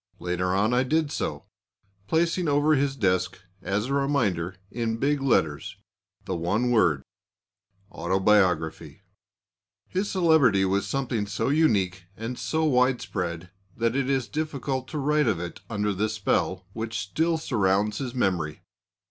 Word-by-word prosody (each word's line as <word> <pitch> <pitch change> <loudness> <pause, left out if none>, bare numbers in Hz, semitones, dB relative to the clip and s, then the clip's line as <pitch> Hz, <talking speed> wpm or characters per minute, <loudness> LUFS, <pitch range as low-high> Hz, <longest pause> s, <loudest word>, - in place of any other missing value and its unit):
Later 90 +1 -1
on 105 +5 +2
I 125 - +4
did 150 +3 +1
so, - - -3 0.6
placing 170 - +1
over 145 +1 +3
his 140 -1 +1
desk 95 -7 0 0.2
as 100 +3 -1
a 135 - -2
reminder, 110 - 0 0.2
in 115 -1 -2
big 140 +3 +1
letters, 80 - 0 0.5
the 95 - -2
one 100 +9 0
word 85 - +3 0.9
"Autobiography." 95 -2 +1 0.8
His 195 +3 -2
celebrity 155 - +4
was 100 +1 0
something 125 -6 -1
so 105 - -1
unique, 100 - +2
and 115 +3 -5
so 160 0 -1
widespread, 115 - 0 0.3
that 115 +1 0
it 135 -1 0
is 135 -3 0
difficult 140 -4 -3
to 155 - -5
write 150 0 +2
of 105 -7 +1
it 85 0 -6
under 105 -2 -1
the 105 +3 0
spell 95 -3 -1
which 110 0 -4
still 160 - 0
surrounds 105 -7 +1
his 130 -3 -4
memory. 90 -10 -1
115 Hz, 140 wpm, -26 LUFS, 95-140 Hz, 0.9 s, I